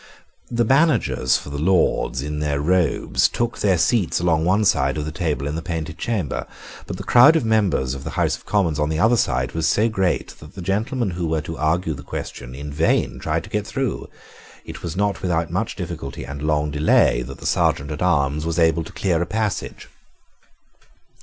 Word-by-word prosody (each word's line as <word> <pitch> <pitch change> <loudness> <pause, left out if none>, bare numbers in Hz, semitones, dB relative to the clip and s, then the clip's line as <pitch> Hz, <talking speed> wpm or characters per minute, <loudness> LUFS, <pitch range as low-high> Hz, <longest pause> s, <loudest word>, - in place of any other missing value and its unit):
The 120 0 +1
managers 110 - +3
for 70 - -9
the 70 - -4
Lords, 85 -6 +1
in 75 0 -4
their 75 -2 -1
robes, 90 +3 +2
took 120 0 -2
their 95 -3 +2
seats 100 +1 +1
along 80 -2 +2
one 100 +4 +2
side 70 -5 +2
of 75 - -3
the 80 - -4
table 75 -4 -2
in 75 - -2
the 80 - -3
Painted 80 -1 -5
Chamber: 105 - -2 0.4
but - - -5
the 100 - -6
crowd 125 +9 +7
of 155 -7 +1
members 100 - +1
of 70 0 -7
the 80 - -5
House - - +2
of - - -15
Commons 85 -8 0
on 75 0 +1
the 80 - -1
other 110 +8 +4
side 65 - 0
was 80 0 -1
so 110 +2 +2
great 95 -5 0
that 75 - -14
the 95 - -7
gentlemen 105 +4 -1
who 85 -1 -3
were 80 -1 0
to 80 +2 -6
argue 80 +2 0
the 70 - -8
question 65 -2 -7
in 70 +1 -7
vain 65 -5 +1
tried 80 +4 -1
to 105 - -13
get 105 0 -2
through. 135 -2 -3 0.6
It - - -9
was 85 +1 -5
not 100 0 0
without 85 -3 -1
much - - -2
difficulty 70 - -6
and 70 +1 -7
long 75 -1 0
delay 75 -4 +3
that 65 +3 -8
the - - -12
Serjeant 70 +2 +1
at 75 - -5
Arms 75 -4 +1
was 85 0 -2
able 80 -1 +3
to - - -11
clear 90 -4 0
a 85 - -1
passage. 110 +1 -3
80 Hz, 205 wpm, -22 LUFS, 75-100 Hz, 0.6 s, crowd